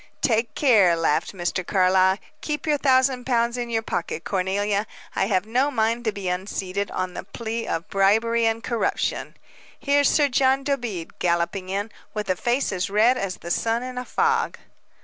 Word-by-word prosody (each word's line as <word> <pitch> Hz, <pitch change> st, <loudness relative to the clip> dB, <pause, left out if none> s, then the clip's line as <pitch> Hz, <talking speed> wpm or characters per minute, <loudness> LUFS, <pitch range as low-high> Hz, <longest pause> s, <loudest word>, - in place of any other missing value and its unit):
"Take 230 Hz, -1 st, +1 dB
care," 210 Hz, -, +5 dB
laughed 165 Hz, -1 st, 0 dB
Mr. 185 Hz, 0 st, -2 dB
Carlyle. 190 Hz, 0 st, +3 dB, 0.2 s
"Keep 300 Hz, -1 st, -3 dB
your 300 Hz, -2 st, +1 dB
thousand 260 Hz, -2 st, +3 dB
pounds 235 Hz, -1 st, +1 dB
in 240 Hz, -1 st, -3 dB
your 225 Hz, -1 st, -1 dB
pocket, 165 Hz, -5 st, -3 dB
Cornelia. 200 Hz, +2 st, -1 dB, 0.3 s
I 190 Hz, -, +1 dB
have 190 Hz, -2 st, +1 dB
no 250 Hz, +6 st, +1 dB
mind 230 Hz, -2 st, 0 dB
to 220 Hz, -, +2 dB
be 200 Hz, -2 st, -6 dB
unseated, 190 Hz, +1 st, -3 dB
on 185 Hz, -1 st, -3 dB
the -, -, -6 dB
plea 225 Hz, +4 st, -5 dB
of 165 Hz, +4 st, -3 dB
'bribery 225 Hz, +4 st, +2 dB
and 225 Hz, +1 st, -1 dB
corruption.' 235 Hz, -2 st, -1 dB, 0.4 s
Here's 285 Hz, 0 st, +3 dB
Sir 295 Hz, -2 st, +3 dB
John 270 Hz, 0 st, +2 dB
Dobede 240 Hz, -, -3 dB
galloping 175 Hz, +2 st, 0 dB
in, 200 Hz, +3 st, -2 dB, 0.2 s
with 210 Hz, -3 st, -1 dB
a -, -, +1 dB
face 245 Hz, +8 st, 0 dB
as 190 Hz, 0 st, -2 dB
red 220 Hz, +5 st, +4 dB
as 195 Hz, -6 st, -3 dB
the 170 Hz, -, -7 dB
sun 230 Hz, +5 st, 0 dB
in 255 Hz, 0 st, -5 dB
a -, -, -4 dB
fog." 455 Hz, -, 0 dB
220 Hz, 175 wpm, -24 LUFS, 190-250 Hz, 0.4 s, care